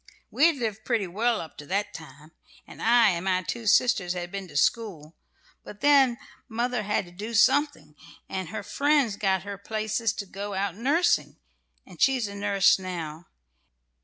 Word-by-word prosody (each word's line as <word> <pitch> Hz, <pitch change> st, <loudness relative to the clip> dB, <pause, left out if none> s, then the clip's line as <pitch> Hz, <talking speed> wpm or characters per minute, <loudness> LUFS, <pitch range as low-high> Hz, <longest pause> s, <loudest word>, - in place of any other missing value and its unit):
We 305 Hz, -, +5 dB
had 335 Hz, -, +1 dB
lived 220 Hz, -5 st, -4 dB
pretty 230 Hz, -5 st, 0 dB
well 220 Hz, +6 st, 0 dB
up 160 Hz, -, -9 dB
to 150 Hz, -, -9 dB
that 200 Hz, +4 st, -2 dB
time, 155 Hz, 0 st, -12 dB, 0.3 s
and -, -, -13 dB
I 230 Hz, -2 st, +5 dB
and 170 Hz, +1 st, -4 dB
my 185 Hz, -1 st, +1 dB
two 230 Hz, +3 st, -5 dB
sisters 200 Hz, -5 st, +3 dB
had 175 Hz, -1 st, -5 dB
been 195 Hz, -1 st, -6 dB
to 145 Hz, -, -6 dB
school; 170 Hz, -7 st, -1 dB, 0.5 s
but 205 Hz, -, -12 dB
then 275 Hz, -4 st, +5 dB, 0.3 s
mother 240 Hz, +1 st, -1 dB
had 210 Hz, -1 st, -1 dB
to 175 Hz, -, -15 dB
do 210 Hz, +6 st, -6 dB
something, 275 Hz, -, +2 dB, 0.3 s
and 190 Hz, -4 st, -5 dB
her -, -, -5 dB
friends 285 Hz, -7 st, +1 dB
got 190 Hz, -2 st, 0 dB
her 200 Hz, -1 st, -7 dB
places 215 Hz, +1 st, -1 dB
to 205 Hz, -, -6 dB
go 200 Hz, +1 st, -6 dB
out 195 Hz, -2 st, -2 dB
nursing, 285 Hz, -, +1 dB, 0.5 s
and -, -, -14 dB
she's 260 Hz, -5 st, +3 dB
a 200 Hz, -, -8 dB
nurse 200 Hz, -1 st, +3 dB
now. 170 Hz, -3 st, -6 dB
205 Hz, 175 wpm, -26 LUFS, 185-235 Hz, 0.5 s, We